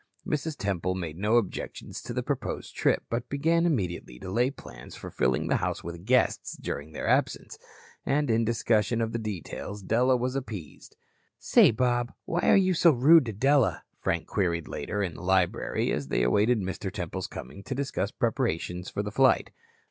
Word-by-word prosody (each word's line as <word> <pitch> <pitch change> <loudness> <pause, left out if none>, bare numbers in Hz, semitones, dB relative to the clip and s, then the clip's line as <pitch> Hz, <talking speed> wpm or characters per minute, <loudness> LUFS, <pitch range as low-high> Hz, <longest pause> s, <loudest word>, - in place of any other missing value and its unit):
Mrs. 150 0 -2
Temple 95 -2 -1
made 85 -4 -4
no 105 +3 +2
objections 110 -6 -3
to - - -7
the - - -2
proposed - - -4
trip, - - +2
but 120 +1 -3
began 165 +4 +2
immediately 90 - -2
to 95 - -7
lay 120 +5 +2
plans 140 - -11
for - - -8
filling 60 0 +1
the - - +2
house - - -2
with 85 +3 -8
guests 125 0 +2
during 80 - -5
their 80 - -5
absence. - - 0 0.4
And 145 -2 +1
in 115 +1 +3
discussion 110 0 +1
of 115 -1 -1
the 115 - -1
details, 100 -1 -6
Della 125 +5 +3
was 125 +2 -2
appeased. 110 - -7 0.4
"Say, - - +5
Bob, 120 +1 0
why 175 +1 -1
are - - +7
you 185 -1 +3
so 170 0 +5
rude 150 +1 +6
to - - -2
Della?" 135 +2 +2 0.2
Frank 85 -1 -1
queried 85 -5 -1
later, 105 0 -3
in 90 -4 -3
the - - -10
library, 95 -1 +1
as 70 -2 -2
they 60 - +1
awaited 105 - +3
Mr. 95 0 -4
Temple's - - -4
coming 70 +10 -9
to 130 +6 -5
discuss 135 -7 -2
preparations 110 - -2
for 100 - -3
the 105 - -4
flight. 130 +4 +3
110 Hz, 180 wpm, -27 LUFS, 95-130 Hz, 0.4 s, are